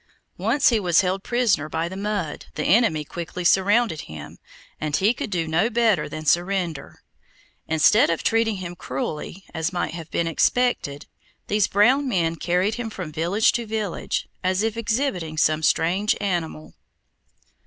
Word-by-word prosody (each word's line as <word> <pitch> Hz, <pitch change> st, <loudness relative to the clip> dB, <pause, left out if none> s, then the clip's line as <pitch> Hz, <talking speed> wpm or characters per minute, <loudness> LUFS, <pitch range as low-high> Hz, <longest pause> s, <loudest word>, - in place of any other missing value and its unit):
Once 230 Hz, +9 st, +3 dB
he 230 Hz, -3 st, +2 dB
was 175 Hz, -3 st, +3 dB
held 190 Hz, 0 st, -1 dB
prisoner 230 Hz, -10 st, +1 dB
by 165 Hz, +2 st, -2 dB
the 185 Hz, -, -7 dB
mud, 200 Hz, -6 st, -3 dB
the 155 Hz, -, -2 dB
enemy 195 Hz, -7 st, +3 dB
quickly 175 Hz, +3 st, -6 dB
surrounded 200 Hz, 0 st, +3 dB
him, 75 Hz, -2 st, -10 dB, 0.4 s
and 155 Hz, -1 st, -1 dB
he 205 Hz, +5 st, +3 dB
could 230 Hz, -, -5 dB
do 170 Hz, -4 st, -1 dB
no 165 Hz, +8 st, +1 dB
better 225 Hz, -8 st, +2 dB
than 155 Hz, 0 st, -7 dB
surrender. 175 Hz, -2 st, -1 dB, 0.6 s
Instead 160 Hz, +7 st, +4 dB
of 165 Hz, -, -1 dB
treating 225 Hz, -1 st, +2 dB
him 180 Hz, -2 st, -6 dB
cruelly, 150 Hz, +6 st, -5 dB
as 160 Hz, 0 st, -2 dB
might 175 Hz, -3 st, -2 dB
have 165 Hz, -2 st, -8 dB
been 170 Hz, -, -1 dB
expected, 165 Hz, -, 0 dB, 0.4 s
these 210 Hz, -1 st, +1 dB
brown 255 Hz, +7 st, +3 dB
men 170 Hz, -7 st, 0 dB
carried 180 Hz, +5 st, 0 dB
him 225 Hz, -, -4 dB
from 185 Hz, -7 st, -7 dB
village 175 Hz, +8 st, +2 dB
to 235 Hz, -1 st, -3 dB
village, 215 Hz, -4 st, -3 dB, 0.2 s
as 185 Hz, +2 st, +1 dB
if 225 Hz, 0 st, -1 dB
exhibiting 225 Hz, -, -2 dB
some 155 Hz, 0 st, +2 dB
strange 180 Hz, +6 st, +2 dB
animal. 175 Hz, -6 st, -3 dB
185 Hz, 155 wpm, -23 LUFS, 160-215 Hz, 0.6 s, Instead